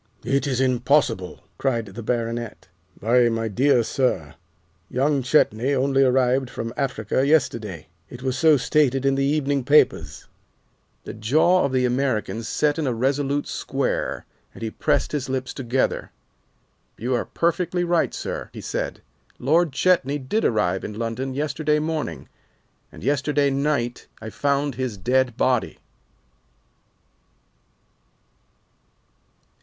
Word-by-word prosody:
"It 140 +2 +1
is 130 -2 -1
impossible!" 130 -6 +1 0.2
cried 120 -4 0
the 105 +3 -9
Baronet. 115 -3 -3 0.3
"Why, 120 +2 +3
my 115 0 -1
dear 125 +3 +3
sir, 110 - -1 0.6
young 140 +2 +1
Chetney 130 -1 +2
only 135 +1 +2
arrived 130 0 +2
from 115 -1 -5
Africa 130 -3 -1
yesterday. 115 - 0 0.2
It 125 +1 -10
was 130 -1 -1
so 155 +2 +5
stated 135 -1 +1
in 135 - +3
the 135 0 0
evening 140 -1 +1
papers." 145 +4 +2 0.8
The - - -7
jaw 155 +12 +3
of 140 - -1
the 130 -1 +2
American 125 -3 -1
set 145 +6 0
in 150 - -1
a 125 - +1
resolute 140 +3 0
square, - - -2 0.3
and - - -9
he 110 - -3
pressed - - 0
his 140 -3 -3
lips 130 0 -3
together. 130 -1 -1 0.9
"You 125 +3 -2
are 120 - +1
perfectly 175 +1 0
right, 175 -1 +1
sir," - - -5
he - - -8
said, - - -4 0.4
"Lord 160 +5 +2
Chetney 145 -2 +2
did 145 +11 -2
arrive 100 -5 +1
in 105 - -6
London 120 +3 -3
yesterday 150 +1 0
morning, 150 - -3 0.6
and - - -12
yesterday 140 +1 +1
night 135 -3 -1
I 110 0 -7
found 140 +4 0
his 125 -3 -3
dead 125 +4 +1
body." 125 -3 +1
130 Hz, 130 wpm, -23 LUFS, 120-145 Hz, 0.9 s, so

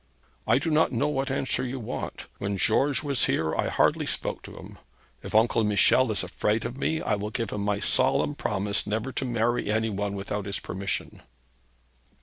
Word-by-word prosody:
'I - - +5
do 150 +4 -1
not 155 +1 +3
know 140 +4 +1
what 135 -2 -1
answer 135 -2 -1
you 130 +1 -3
want. 110 - -5
When 100 0 -2
George 135 +7 +2
was 140 -4 +2
here, 80 -1 0
I - - 0
hardly - - +2
spoke - - -2
to - - -11
him. - - -11 0.4
If - - -7
Uncle 115 +1 +4
Michel 105 +4 +4
is 105 - 0
afraid 105 +5 -1
of 120 - -4
me, 160 +4 -1
I - - 0
will 105 +1 -2
give 115 -2 -3
him 105 - -3
my 100 0 0
solemn 145 - +2
promise 100 -7 -1
never 110 +5 -2
to 135 - -3
marry 120 -2 0
any 110 +1 +1
one 100 0 -2
without 100 0 -4
his 100 - -2
permission.' 95 +1 -4
110 Hz, 190 wpm, -27 LUFS, 100-130 Hz, 0.4 s, I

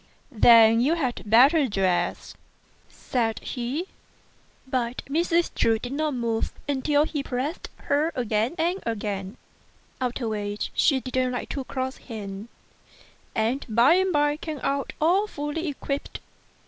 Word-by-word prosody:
"Then 230 -1 +6
you 295 +7 +3
had 260 -7 -2
better 270 +7 +6
dress," 190 -4 -1 0.6
said 230 -3 -2
he; 260 +7 -3 0.8
but 250 -2 -2
Mrs. 335 +3 +1
Chu 225 -1 +2
did 245 +3 -7
not 300 -1 -1
move 230 -2 -1
until 290 +1 +2
he 300 -2 -3
pressed 275 +5 -4
her 295 +3 +1
again 230 +3 0
and 345 +4 0
again, 205 -2 -4 0.6
after 250 -1 -2
which 205 -1 -3
she 275 -4 +3
did 255 0 -7
not 255 -1 +1
like 245 - -4
to 275 - -3
cross 260 0 -4
him, 205 -2 -8 0.9
and 230 +5 0
by 235 +7 +5
and 375 +1 +2
by 295 -1 +2
came 310 -2 -6
out 275 -1 -1
all 365 +7 +3
fully 295 0 -4
equipped. 280 -1 -4
260 Hz, 135 wpm, -25 LUFS, 230-295 Hz, 0.9 s, Then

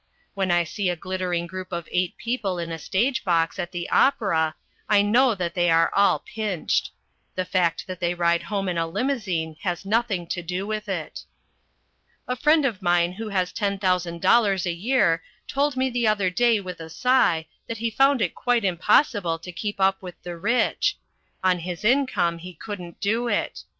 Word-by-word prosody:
When 195 -2 -1
I 175 0 +3
see 180 +3 -2
a 175 - 0
glittering 180 -1 -2
group 185 +1 -7
of 170 -2 -4
eight 180 -1 0
people 230 -6 -2
in 170 -1 -4
a 165 - -4
stage 240 - 0
box 170 0 +1
at 175 -1 -3
the 175 -1 -4
opera, 160 - +2 0.3
I 205 -1 +5
know 235 +3 +4
that 175 -3 -3
they 175 -1 +2
are 165 0 +4
all 200 +1 +4
pinched. 210 -6 -2 0.5
The 185 - -1
fact 175 -3 0
that 185 -2 -7
they 175 0 0
ride 170 -1 +2
home 200 -2 -3
in 175 -2 -1
a 165 - 0
limousine 180 - -2
has 180 0 -3
nothing 210 -4 0
to 175 - -2
do 180 +3 -3
with 215 0 -4
it. 175 -5 -4 1.0
A 250 - -1
friend 300 +4 +3
of 215 -7 -1
mine 175 -1 +2
who 215 +4 -6
has 185 -3 -1
ten 200 -2 -1
thousand 180 -3 -1
dollars 200 -6 +4
a 175 - 0
year 170 -4 +2 0.3
told 280 -1 0
me 260 0 +2
the 245 -3 0
other 205 -4 +2
day 235 +2 +3
with 180 -3 -7
a 165 0 -8
sigh 175 -5 +2 0.2
that 230 - -4
he 230 +1 -2
found 270 +1 +3
it 180 - -1
quite 245 -3 +1
impossible 185 - +2
to 175 +2 -9
keep 205 +3 -4
up 190 0 +2
with 180 -2 -8
the 175 -1 -6
rich. 240 - +1 0.5
On 185 -1 +3
his 175 +3 -6
income 210 -10 +2
he 180 +1 -10
couldn't 180 -2 -8
do 225 +4 0
it. - - -2
185 Hz, 190 wpm, -24 LUFS, 175-220 Hz, 1.0 s, I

